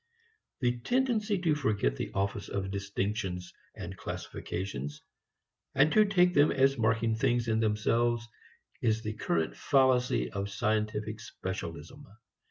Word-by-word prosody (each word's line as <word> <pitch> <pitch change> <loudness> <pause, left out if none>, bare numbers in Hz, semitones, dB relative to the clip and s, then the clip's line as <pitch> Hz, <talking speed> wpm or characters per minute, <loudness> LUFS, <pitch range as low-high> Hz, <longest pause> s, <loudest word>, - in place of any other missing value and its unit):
The 120 -1 +1
tendency 225 - +1
to 175 -4 +2
forget 105 - +1
the - - -4
office 100 +1 -1
of 95 -1 -3
distinctions 100 -2 -3 0.2
and - - -7
classifications, 75 -6 -5 0.7
and 145 +3 +5
to 215 -1 +6
take 180 -3 +4
them 145 -1 +5
as 135 0 +3
marking 115 -1 +2
things 120 +1 +1
in 110 0 +2
themselves, 115 +2 +1 0.5
is 110 -1 +1
the 110 -1 -3
current 85 -6 -1
fallacy 130 -3 +2
of 100 -1 -3
scientific 110 0 -1
specialism. 95 - -7
110 Hz, 125 wpm, -30 LUFS, 100-135 Hz, 0.7 s, to